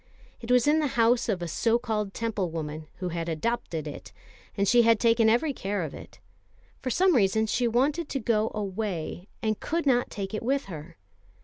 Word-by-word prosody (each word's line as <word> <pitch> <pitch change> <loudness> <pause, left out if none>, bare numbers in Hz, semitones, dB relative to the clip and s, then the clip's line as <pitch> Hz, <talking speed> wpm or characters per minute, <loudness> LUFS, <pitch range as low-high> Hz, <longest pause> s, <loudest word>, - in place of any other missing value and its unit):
It 230 - -9
was 250 -1 +4
in 300 +2 +4
the 300 - +1
house 235 +1 +3
of 185 -5 -1
a - - -3
so 225 +8 +2
called 215 -4 -3
Temple 215 -6 -1
woman, 155 -1 -5
who 180 0 -4
had 170 0 -3
adopted 165 -2 -2
it, 95 -10 -8 0.5
and 200 0 +1
she 240 +4 +6
had 230 -1 +4
taken 230 -1 +4
every 275 +6 +2
care 200 -5 -2
of 155 - -5
it. 95 +1 -12 0.6
For 260 - -3
some 365 +6 +3
reason 220 0 +3
she 240 +3 +1
wanted 285 +7 +1
to 275 - -2
go 220 -2 +1
away, 195 -4 -4 0.2
and 215 -1 0
could 335 +1 -2
not 245 -3 +2
take 195 -1 -5
it 215 - -2
with 270 +4 0
her. 165 -2 -9
220 Hz, 200 wpm, -27 LUFS, 180-240 Hz, 0.6 s, she